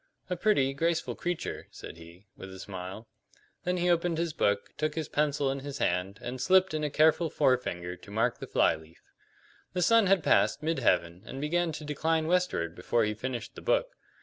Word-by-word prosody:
"A - - +1
pretty, 165 -8 +2
graceful 165 +4 0
creature," 175 -1 -4
said - - -10
he, 85 +4 -14
with 95 - -10
a 95 - -9
smile. 95 +3 -7 0.6
Then 180 +1 0
he 175 0 0
opened 170 -1 +2
his 165 -1 -1
book, 100 -8 0
took 155 0 -2
his 160 -3 -2
pencil 145 -2 +1
in 135 - -3
his 140 0 -6
hand, 90 0 -1
and 125 +1 -5
slipped 190 +5 +4
in 155 -1 -1
a 150 - 0
careful 160 +3 +3
forefinger 90 -12 0
to 90 - -16
mark 115 +4 0
the - - -7
fly - - +3
leaf. 80 +1 -16 0.7
The 180 -1 +1
sun 230 +2 +5
had 190 -3 +3
passed 150 - +3
mid 160 -1 0
heaven 90 -6 +1
and 135 - -6
began 170 +3 0
to 150 - -7
decline 160 +2 0
westward 170 - 0
before 100 +6 0
he 105 0 0
finished 115 0 -5
the - - -10
book. - - 0
145 Hz, 200 wpm, -29 LUFS, 100-170 Hz, 0.7 s, sun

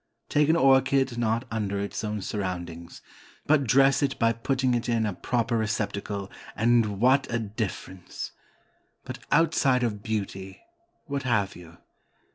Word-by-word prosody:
Take 150 0 +2
an 160 - +5
orchid 135 -3 +3
not 115 +1 0
under 100 -3 -2
its 100 +2 -4
own 105 -2 -3
surroundings, 90 -4 -5 0.4
but 145 -2 +3
dress 135 +3 +4
it 140 -1 0
by 115 -1 +2
putting 130 +2 0
it 120 0 -1
in 115 -2 +1
a 105 - -1
proper 115 +5 -1
receptacle, 105 -2 -3 0.2
and 110 -3 +2
what 130 +4 +3
a 115 - +1
difference! 105 -4 -5 0.7
But, - - -7
outside 140 -5 +3
of 105 -4 -2
beauty 95 -3 -4 0.5
what 140 -2 -3
have 110 -7 0
you? 85 -1 -13
115 Hz, 140 wpm, -26 LUFS, 100-130 Hz, 0.7 s, an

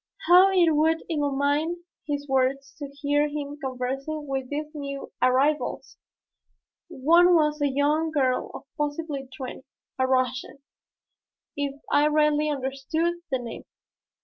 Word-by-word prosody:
How 365 +2 +7
it 355 -4 +4
would 320 +2 +2
illumine 295 +3 0 0.2
his 285 -1 -3
words 270 +1 0
to 285 - -5
hear 290 +1 0
him 290 0 -5
conversing 270 +4 -3
with 270 -2 -3
these 300 +1 -4
new 280 -2 -6
arrivals! 265 +4 +1 0.9
One 345 +3 +4
was 300 -2 +2
a 290 - +3
young 295 +4 +1
girl 265 -5 0
of - - -8 0.2
possibly 295 -2 -3
twenty 260 -2 -6 0.4
a 260 - +2
Russian 255 0 0 1.0
if 285 -1 -3
I 295 +1 +4
rightly 300 0 +2
understood 290 +5 -2
the 265 - +1
name. 240 -2 -8
290 Hz, 125 wpm, -25 LUFS, 270-310 Hz, 1.0 s, How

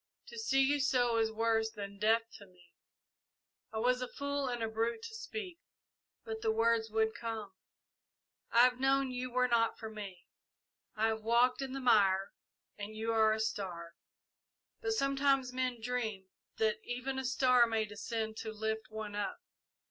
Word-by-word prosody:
To 470 - -8
see 270 -11 +3
you 285 +2 +2
so 245 -4 +2
is 220 0 +1
worse 225 0 +1
than 200 -2 -8
death 225 +2 +4 0.2
to 200 - -13
me. 180 -2 -23 1.0
I 220 - -5
was 250 +3 +2
a 250 - -2
fool 280 0 -3
and 240 -2 -2
a - - +1
brute 230 - -1
to 460 -1 -7
speak, 430 -5 -6 0.7
but 220 0 -5
the 220 - +2
words 225 0 +2
would 220 0 +1
come. 225 -3 -5 1.0
I 235 - +6
have 250 0 +4
known 270 0 +2
you 250 0 -3
were 250 +1 +2
not 230 -2 +2
for 220 -1 -7
me. 195 -5 -8 0.7
I 220 +1 +2
have 220 0 -2
walked 235 +4 +3
in 265 -1 -4
the 270 - -3
mire, 200 -6 +4 0.5
and 205 +1 -6
you 225 +1 -1
are 220 -1 +5
a 220 - 0
star; 180 -6 -3 0.9
but 445 -1 0
sometimes 275 - +2
men 255 -2 -1
dream 220 -5 -3 0.3
that 215 -1 +1
even 255 +2 -3
a - - -3
star 250 -1 +4
may 225 -1 0
descend 220 +1 -4
to 220 - -4
lift 220 0 -3
one 215 -1 -6
up. 205 -1 -2
225 Hz, 170 wpm, -33 LUFS, 220-255 Hz, 1.0 s, I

